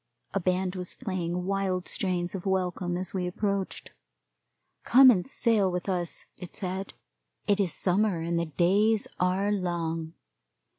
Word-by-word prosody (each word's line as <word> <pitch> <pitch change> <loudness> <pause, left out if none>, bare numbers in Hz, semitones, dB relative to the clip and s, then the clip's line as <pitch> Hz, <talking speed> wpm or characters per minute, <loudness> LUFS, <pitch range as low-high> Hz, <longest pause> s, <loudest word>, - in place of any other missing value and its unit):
A 195 - +1
band 185 0 0
was 180 -1 -5
playing 180 -5 -3
wild 190 -2 -1
strains 180 -2 -1
of 190 0 -5
welcome 180 -2 -1
as 185 +1 -2
we 180 -2 -1
approached. 200 +1 -3 0.9
Come 260 +1 +8
and 185 -6 0
sail 220 -7 +2
with 180 +1 -3
us, 175 -3 -2
it 180 - -9
said 190 0 -2 0.5
it 205 0 +2
is 190 -4 +1
summer, 190 +1 +1
and 170 +1 -1
the 170 - 0
days 200 +7 +2
are 185 +3 +1
long. 165 -4 -2
185 Hz, 145 wpm, -28 LUFS, 175-195 Hz, 0.9 s, Come